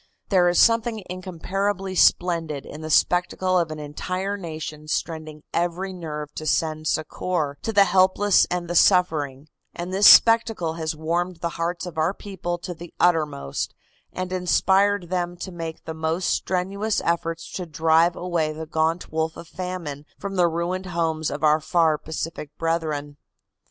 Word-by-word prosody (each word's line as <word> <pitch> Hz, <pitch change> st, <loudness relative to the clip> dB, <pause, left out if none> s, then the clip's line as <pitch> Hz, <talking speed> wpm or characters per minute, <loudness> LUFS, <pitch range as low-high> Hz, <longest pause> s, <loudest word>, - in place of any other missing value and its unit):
There 180 Hz, -3 st, +4 dB
is 175 Hz, -, 0 dB
something 230 Hz, -2 st, +3 dB
incomparably 190 Hz, +2 st, -3 dB
splendid 165 Hz, -5 st, +2 dB
in 150 Hz, -, -9 dB
the 155 Hz, -, -6 dB
spectacle 180 Hz, +3 st, +2 dB
of 170 Hz, -2 st, 0 dB
an 155 Hz, -, -6 dB
entire 185 Hz, +7 st, -3 dB
nation 155 Hz, -4 st, -7 dB
straining 155 Hz, -1 st, -4 dB
every 175 Hz, +3 st, -1 dB
nerve 150 Hz, -4 st, -6 dB
to 155 Hz, -, -4 dB
send 155 Hz, 0 st, 0 dB
succor 155 Hz, -1 st, -1 dB
to 225 Hz, -, -2 dB
the 200 Hz, -2 st, +6 dB
helpless 190 Hz, +2 st, +4 dB
and 180 Hz, -1 st, -2 dB
the 175 Hz, -, -3 dB
suffering, 155 Hz, -7 st, +3 dB, 0.3 s
and 175 Hz, +2 st, -5 dB
this 200 Hz, +2 st, +6 dB
spectacle 225 Hz, -7 st, +6 dB
has 160 Hz, -1 st, -3 dB
warmed 170 Hz, +3 st, -1 dB
the 170 Hz, +1 st, -3 dB
hearts 170 Hz, +2 st, -3 dB
of 170 Hz, -3 st, -6 dB
our 165 Hz, +5 st, +1 dB
people 175 Hz, -3 st, -4 dB
to 175 Hz, +1 st, -6 dB
the 170 Hz, 0 st, -11 dB
uttermost 150 Hz, -, 0 dB, 0.4 s
and 185 Hz, 0 st, -4 dB
inspired 190 Hz, +1 st, +2 dB
them 175 Hz, -1 st, -1 dB
to 190 Hz, -, -6 dB
make 165 Hz, -2 st, -6 dB
the 160 Hz, -, -4 dB
most 160 Hz, +3 st, -1 dB
strenuous 195 Hz, +4 st, -1 dB
efforts 165 Hz, -1 st, -2 dB
to 180 Hz, -2 st, -5 dB
drive 165 Hz, +2 st, +3 dB
away 170 Hz, -4 st, -1 dB
the 160 Hz, +1 st, -6 dB
gaunt 160 Hz, +2 st, -1 dB
wolf 160 Hz, 0 st, -1 dB
of 170 Hz, 0 st, -10 dB
famine 170 Hz, -6 st, -6 dB
from 200 Hz, -1 st, -5 dB
the 175 Hz, -2 st, +4 dB
ruined 175 Hz, +3 st, -2 dB
homes 160 Hz, -2 st, -1 dB
of 145 Hz, +2 st, -5 dB
our 155 Hz, 0 st, +5 dB
far 160 Hz, -1 st, +2 dB
Pacific 160 Hz, -1 st, -5 dB
brethren. 155 Hz, -3 st, -2 dB
170 Hz, 160 wpm, -24 LUFS, 160-185 Hz, 0.4 s, the